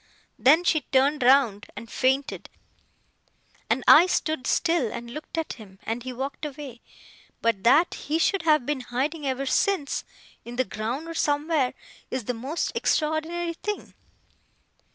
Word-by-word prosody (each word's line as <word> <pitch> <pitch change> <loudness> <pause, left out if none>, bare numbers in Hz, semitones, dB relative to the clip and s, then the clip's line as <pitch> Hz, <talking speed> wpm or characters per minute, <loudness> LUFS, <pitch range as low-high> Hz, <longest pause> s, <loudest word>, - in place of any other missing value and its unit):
Then 285 +10 +5
she 315 -3 +2
turned 275 +2 +3
round 245 -5 +4
and 230 - -8
fainted, 265 +4 -1 1.2
and - - +1
I 355 - +9
stood 315 -6 -1
still 330 -10 +1
and 235 0 -7
looked 305 +5 -8
at 325 - -2
him, 200 -5 -14
and 230 +2 -3
he 255 +1 -6
walked 270 +4 -5
away; 280 -5 -7 0.6
but 230 -4 0
that 295 +9 +5
he 305 +2 -2
should 385 +3 +1
have 305 -6 +3
been 290 -2 -2
hiding 275 +5 -2
ever 265 +1 -1
since 305 +1 0 0.4
(in 240 +1 -8
the 255 +1 +1
ground 230 +10 -4
or 330 - -5
somewhere), 295 -3 0 0.3
is 260 -4 -4
the 250 - -1
most 265 +8 -3
extraordinary 325 +2 0
thing! 420 +5 -5
280 Hz, 150 wpm, -25 LUFS, 245-315 Hz, 1.2 s, I